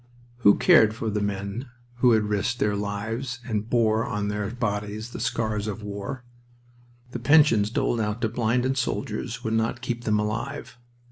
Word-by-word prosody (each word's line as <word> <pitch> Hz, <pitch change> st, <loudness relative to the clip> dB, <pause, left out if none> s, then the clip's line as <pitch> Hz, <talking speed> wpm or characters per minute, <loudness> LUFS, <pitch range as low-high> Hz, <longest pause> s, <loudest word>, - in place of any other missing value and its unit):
Who 100 Hz, -4 st, +6 dB
cared 110 Hz, -1 st, +5 dB
for 115 Hz, -1 st, -3 dB
the 105 Hz, 0 st, -1 dB
men 100 Hz, +5 st, -3 dB, 0.3 s
who 125 Hz, -1 st, +5 dB
had 110 Hz, -1 st, +3 dB
risked 105 Hz, +3 st, -1 dB
their 105 Hz, -3 st, +1 dB
lives 115 Hz, +5 st, -3 dB
and 110 Hz, -2 st, -2 dB
bore 115 Hz, -2 st, +2 dB
on 105 Hz, 0 st, -2 dB
their 105 Hz, -1 st, -2 dB
bodies 105 Hz, -1 st, -3 dB
the -, -, -7 dB
scars 110 Hz, -3 st, -1 dB
of 105 Hz, 0 st, -5 dB
war? 100 Hz, +5 st, -5 dB, 0.9 s
The 120 Hz, -, -4 dB
pensions 125 Hz, -6 st, +5 dB
doled 120 Hz, +1 st, 0 dB
out 105 Hz, +1 st, -2 dB
to 110 Hz, -, +1 dB
blinded 125 Hz, +4 st, 0 dB
soldiers 130 Hz, -, -3 dB
would 110 Hz, -, -1 dB
not 115 Hz, +1 st, 0 dB
keep 120 Hz, -1 st, -3 dB
them 105 Hz, -1 st, +2 dB
alive. 120 Hz, +4 st, -4 dB
110 Hz, 165 wpm, -25 LUFS, 105-120 Hz, 0.9 s, Who